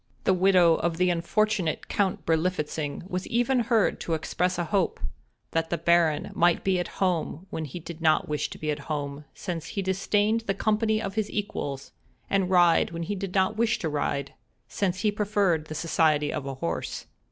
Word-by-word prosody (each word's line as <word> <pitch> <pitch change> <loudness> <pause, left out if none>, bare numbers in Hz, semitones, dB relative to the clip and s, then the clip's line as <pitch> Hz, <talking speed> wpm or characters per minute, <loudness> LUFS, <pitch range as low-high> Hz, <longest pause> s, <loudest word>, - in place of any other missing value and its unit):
The 190 - +3
widow 180 -3 +5
of 170 -1 -1
the 180 0 +3
unfortunate 180 +1 0
Count 195 -3 -1
Berlifitzing 160 -2 -1
was 180 -1 -3
even 245 +2 +2
heard 230 -2 +2
to 165 - -1
express 180 +3 -1
a 175 - 0
hope 185 +2 0 0.5
"that 165 0 0
the 170 - 0
Baron 170 -3 +2
might 175 0 +3
be 190 -2 +2
at 175 - -2
home 180 -2 -1
when 160 - -3
he 150 +5 -7
did 170 0 -9
not 155 -1 +3
wish 150 -1 -1
to - - -9
be 155 0 -2
at 145 - -3
home, 145 -1 -3
since 170 -4 -5
he 195 - +1
disdained 205 +4 +1
the 195 - +1
company 215 +1 +1
of 195 -2 -4
his 215 0 -1
equals; 145 -10 -4 0.4
and 195 -2 +2
ride 175 -2 +4
when 170 0 -5
he 185 - -3
did 195 -1 -5
not 190 +3 +2
wish 230 0 +2
to 160 - -2
ride, 140 -1 -2 0.3
since 185 -2 -1
he 215 - +2
preferred 200 -6 +1
the 155 - -7
society 155 -2 +2
of 145 -3 -4
a 135 - -4
horse." 85 - -4
175 Hz, 190 wpm, -27 LUFS, 160-195 Hz, 0.5 s, widow